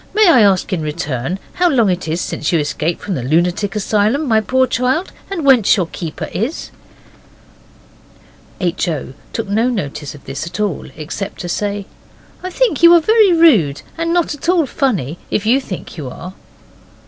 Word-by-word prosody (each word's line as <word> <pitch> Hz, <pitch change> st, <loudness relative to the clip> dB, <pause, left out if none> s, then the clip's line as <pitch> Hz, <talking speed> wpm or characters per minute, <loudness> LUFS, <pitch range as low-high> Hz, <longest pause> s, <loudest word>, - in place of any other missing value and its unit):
May 430 Hz, -1 st, +5 dB
I 265 Hz, -9 st, +6 dB
ask 195 Hz, -2 st, +2 dB
in 175 Hz, -, -1 dB
return 150 Hz, 0 st, -3 dB, 0.2 s
how 355 Hz, 0 st, +2 dB
long 240 Hz, -8 st, +3 dB
it 180 Hz, -1 st, -3 dB
is 160 Hz, +2 st, -1 dB
since -, -, -2 dB
you 170 Hz, -, +3 dB
escaped 150 Hz, +3 st, -2 dB
from 200 Hz, -, -3 dB
the 135 Hz, -, -2 dB
lunatic 175 Hz, -, 0 dB
asylum, 215 Hz, +8 st, +1 dB
my 220 Hz, -2 st, +3 dB
poor 260 Hz, +5 st, +2 dB
child, 255 Hz, +9 st, -1 dB, 0.2 s
and 350 Hz, -7 st, -3 dB
whence 250 Hz, -7 st, +5 dB
your 185 Hz, -, +1 dB
keeper 165 Hz, -1 st, -6 dB
is?' 240 Hz, -, -3 dB, 1.9 s
H. 180 Hz, 0 st, -1 dB
O. 150 Hz, -5 st, -4 dB, 0.2 s
took 225 Hz, -2 st, -4 dB
no 220 Hz, +5 st, +1 dB
notice 150 Hz, -, -4 dB
of 145 Hz, -, -16 dB
this 140 Hz, +4 st, -5 dB
at 170 Hz, -, -7 dB
all, 205 Hz, -6 st, -2 dB
except 165 Hz, +6 st, -6 dB
to 175 Hz, -, -5 dB
say, 200 Hz, +2 st, -2 dB, 0.6 s
'I 370 Hz, -, -4 dB
think 430 Hz, -, 0 dB
you 340 Hz, 0 st, +8 dB
are -, -, +7 dB
very 430 Hz, +3 st, +4 dB
rude, 230 Hz, -, +4 dB
and 330 Hz, 0 st, -2 dB
not 345 Hz, -3 st, +1 dB
at 295 Hz, +3 st, -5 dB
all 350 Hz, -4 st, +3 dB
funny, 190 Hz, -, -1 dB
if 210 Hz, -, -1 dB
you 250 Hz, +5 st, +3 dB
think 185 Hz, -7 st, -8 dB
you 140 Hz, -5 st, -5 dB
are. 180 Hz, +8 st, -9 dB
205 Hz, 185 wpm, -17 LUFS, 170-275 Hz, 1.9 s, you